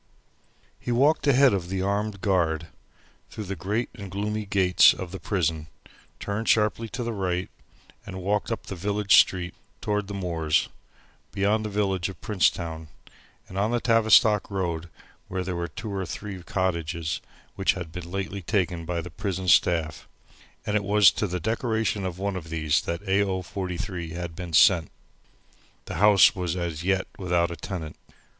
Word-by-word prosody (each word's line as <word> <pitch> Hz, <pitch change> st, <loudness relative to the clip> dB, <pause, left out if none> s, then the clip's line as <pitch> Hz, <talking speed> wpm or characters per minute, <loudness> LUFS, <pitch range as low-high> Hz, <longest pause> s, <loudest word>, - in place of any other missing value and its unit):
He 120 Hz, -, -4 dB
walked 145 Hz, +5 st, +3 dB
ahead 135 Hz, -2 st, +5 dB
of 90 Hz, -3 st, -2 dB
the 95 Hz, 0 st, -2 dB
armed 100 Hz, 0 st, -1 dB
guard, 80 Hz, -5 st, 0 dB, 0.6 s
through 110 Hz, -, -6 dB
the 100 Hz, 0 st, -5 dB
great 105 Hz, +8 st, -2 dB
and 100 Hz, -5 st, -9 dB
gloomy 105 Hz, +2 st, -3 dB
gates 95 Hz, -3 st, +5 dB
of 90 Hz, -2 st, -7 dB
the 95 Hz, -, -6 dB
prison, 80 Hz, -4 st, -1 dB, 0.5 s
turned 105 Hz, +3 st, -3 dB
sharply 110 Hz, +1 st, +2 dB
to 125 Hz, +2 st, -4 dB
the 120 Hz, 0 st, -3 dB
right, 90 Hz, -2 st, -2 dB, 0.5 s
and 95 Hz, -, -7 dB
walked 105 Hz, +4 st, 0 dB
up 115 Hz, -, -3 dB
the 95 Hz, -, -6 dB
village 100 Hz, +2 st, +3 dB
street 90 Hz, -2 st, +3 dB, 0.3 s
toward 105 Hz, -1 st, -1 dB
the 100 Hz, -, -5 dB
moors, 85 Hz, -5 st, 0 dB, 0.6 s
beyond 105 Hz, +2 st, +1 dB
the 105 Hz, -, -3 dB
village 100 Hz, -3 st, 0 dB
of 95 Hz, -, -10 dB
Princetown, 85 Hz, -5 st, 0 dB, 0.6 s
and 95 Hz, -, -5 dB
on 105 Hz, +2 st, +1 dB
the 120 Hz, 0 st, +1 dB
Tavistock 110 Hz, -2 st, +4 dB
Road 85 Hz, -4 st, -3 dB, 0.4 s
where 95 Hz, 0 st, -3 dB
were 85 Hz, 0 st, -2 dB
two 100 Hz, +6 st, -7 dB
or 95 Hz, -2 st, -3 dB
three 95 Hz, +3 st, -6 dB
cottages 85 Hz, -4 st, -2 dB, 0.3 s
which 95 Hz, -, +2 dB
had 90 Hz, -4 st, -7 dB
been 85 Hz, 0 st, -7 dB
lately 95 Hz, +1 st, -4 dB
taken 90 Hz, -3 st, -1 dB
by 85 Hz, 0 st, -2 dB
the 90 Hz, +1 st, -9 dB
prison 95 Hz, -1 st, -4 dB
staff; 80 Hz, -3 st, +2 dB, 0.6 s
and 105 Hz, -, -1 dB
it 105 Hz, -, +1 dB
was 100 Hz, -1 st, +6 dB
to 105 Hz, -, -2 dB
the 90 Hz, 0 st, -3 dB
decoration 110 Hz, -1 st, -1 dB
of 90 Hz, -1 st, -6 dB
one 100 Hz, 0 st, -2 dB
of 85 Hz, -3 st, -6 dB
these 80 Hz, -2 st, +1 dB
that 85 Hz, +4 st, -5 dB
A. 95 Hz, +1 st, +3 dB
O. 95 Hz, -2 st, -1 dB
43 90 Hz, -2 st, -5 dB
had 85 Hz, -1 st, -5 dB
been 90 Hz, -1 st, -7 dB
sent. 85 Hz, -1 st, +5 dB, 1.0 s
The -, -, -5 dB
house 105 Hz, -2 st, +7 dB
was 90 Hz, -2 st, -2 dB
as 85 Hz, -3 st, -3 dB
yet 95 Hz, 0 st, +1 dB
without 85 Hz, -2 st, +1 dB
a -, -, -4 dB
tenant. 80 Hz, -2 st, -6 dB
95 Hz, 170 wpm, -26 LUFS, 85-105 Hz, 1.0 s, house